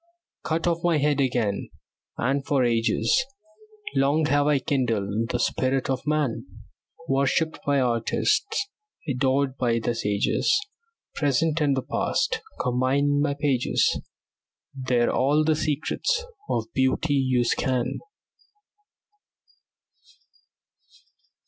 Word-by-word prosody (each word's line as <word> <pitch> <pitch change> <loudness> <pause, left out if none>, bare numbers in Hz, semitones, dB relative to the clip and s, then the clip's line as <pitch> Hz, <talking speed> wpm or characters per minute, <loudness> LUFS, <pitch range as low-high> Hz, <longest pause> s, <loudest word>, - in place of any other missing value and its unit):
Cut 160 0 -1
off 170 -1 +1
my 170 -2 +3
head 145 -1 +1
again, 120 -6 -1 0.5
and 135 +3 0
for 135 -1 +1
ages 120 - +2 0.7
Long 140 +4 +2
have 145 -1 +2
I 150 -1 +4
kindled 115 -5 -1
the 125 - 0
spirit 130 +2 0
of 130 +2 -3
man. 140 -5 0 0.6
Worshipped 140 +4 +1
by 140 -1 +3
artists, 130 - 0 0.4
adored 135 0 0
by 120 -2 +1
the 115 +1 -1
sages, 105 - +1 0.5
Present 155 +2 +1
and 140 -2 +2
past 465 -2 0 0.2
combine 130 +3 +1
in 145 0 +2
my 145 -1 0
pages; 140 -4 +1 0.7
There 130 -3 +1
all 145 +4 +2
the 155 0 +2
secrets 155 - -1 0.2
of 110 - 0
beauty 130 +3 +1
you 130 -3 +2
scan. 125 +1 -1
135 Hz, 105 wpm, -25 LUFS, 125-150 Hz, 0.7 s, I